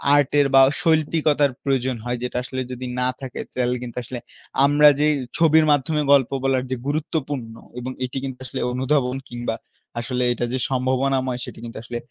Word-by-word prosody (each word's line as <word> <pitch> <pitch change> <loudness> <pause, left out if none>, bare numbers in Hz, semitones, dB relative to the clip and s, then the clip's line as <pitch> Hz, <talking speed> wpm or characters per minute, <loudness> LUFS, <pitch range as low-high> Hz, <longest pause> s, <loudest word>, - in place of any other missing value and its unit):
আর্টের 145 0 +3
বা 135 - +9 0.2
শৈল্পিকতার 155 -3 +2
প্রয়োজন 130 -2 0
হয়। 120 0 -1
যেটা 125 - -3
আসলে 130 +1 -4
যদি 125 0 -5
না 125 - +1
থাকে 130 -3 -6 0.2
চাইলে 125 0 +1
কিন্তু 120 -1 -8
আসলে 125 +1 -6 0.5
আমরা 145 +1 +6
যেই 150 +1 +4 0.2
ছবির 160 -1 +5
মাধ্যমে 145 +2 +1
গল্প 135 -3 +5
বলার 135 -1 +2
যে - - +1
গুরুত্বপূর্ণ 145 -5 -2 0.3
এবং 125 +1 -5
এটি 125 - -6
কিন্তু 130 -2 -5
আসলে 125 - -5
অনুধাবন 130 0 0
কিংবা 120 -1 -3 0.4
আসলে 125 +1 -2
এটা 120 - -2
যে - - +1
সম্ভাবনাময় 130 0 0
সেটি - - -10
কিন্তু 115 - -8
আসলে 120 +1 -5
130 Hz, 170 wpm, -22 LUFS, 125-145 Hz, 0.5 s, বা